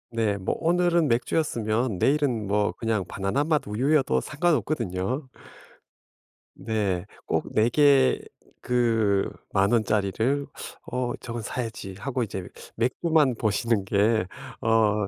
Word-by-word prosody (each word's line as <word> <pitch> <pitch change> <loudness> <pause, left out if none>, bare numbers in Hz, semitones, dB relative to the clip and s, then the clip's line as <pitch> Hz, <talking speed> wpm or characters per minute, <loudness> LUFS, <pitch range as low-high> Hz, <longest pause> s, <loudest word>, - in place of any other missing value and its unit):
네. 110 -3 +1
뭐 95 - -2
오늘은 170 -1 +2
맥주였으면 115 - 0
내일은 135 -2 +1
뭐 105 +1 +1
그냥 110 -4 -1
바나나맛 140 - 0
우유여도 130 +7 +2
상관없거든요. 130 - -1 1.3
네. 100 -6 -1 0.2
꼭 - - -1
4 110 +2 +3
개 140 0 +4 0.4
그 115 -5 +2 0.3
10,000 100 +1 +3
원짜리를 110 +5 +1 0.5
'어 125 -1 -1
저건 120 0 -5
사야지.' 110 -4 -5
하고 130 +4 -3
이제 95 -5 -4 0.3
맥주만 145 +3 +2
보시는 110 -1 +1
게 100 0 +2 0.3
어 105 -2 +2
115 Hz, 225 characters per minute, -26 LUFS, 105-135 Hz, 1.3 s, 개